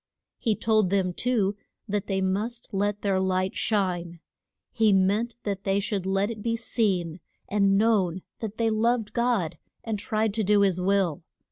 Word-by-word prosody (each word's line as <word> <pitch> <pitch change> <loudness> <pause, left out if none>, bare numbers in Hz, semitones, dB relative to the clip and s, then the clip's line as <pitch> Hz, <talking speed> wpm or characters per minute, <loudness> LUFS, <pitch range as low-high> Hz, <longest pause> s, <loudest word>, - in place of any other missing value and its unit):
He 220 -2 +1
told 215 -4 +2
them, 190 -2 +1
too, 210 -3 0 0.3
that 205 -1 -2
they 190 -1 0
must 215 +6 -2
let 205 0 -1
their 195 -2 +2
light 185 0 0
shine; 175 -5 -1 0.5
he 220 -3 +3
meant 200 +5 +2
that 200 -2 -3
they 195 0 +1
should 200 -2 -2
let 195 +3 +1
it 215 -2 -7
be 230 +1 0
seen 190 -7 0 0.3
and 200 -1 +3
known 195 -5 +2 0.2
that 220 -2 -5
they 225 -1 +1
loved 225 0 +1
God, 225 -9 0 0.2
and 220 -3 -3
tried 215 0 0
to 220 0 0
do 205 +1 +4
his 190 -3 +2
will. 185 -3 +1
200 Hz, 165 wpm, -26 LUFS, 190-220 Hz, 0.5 s, do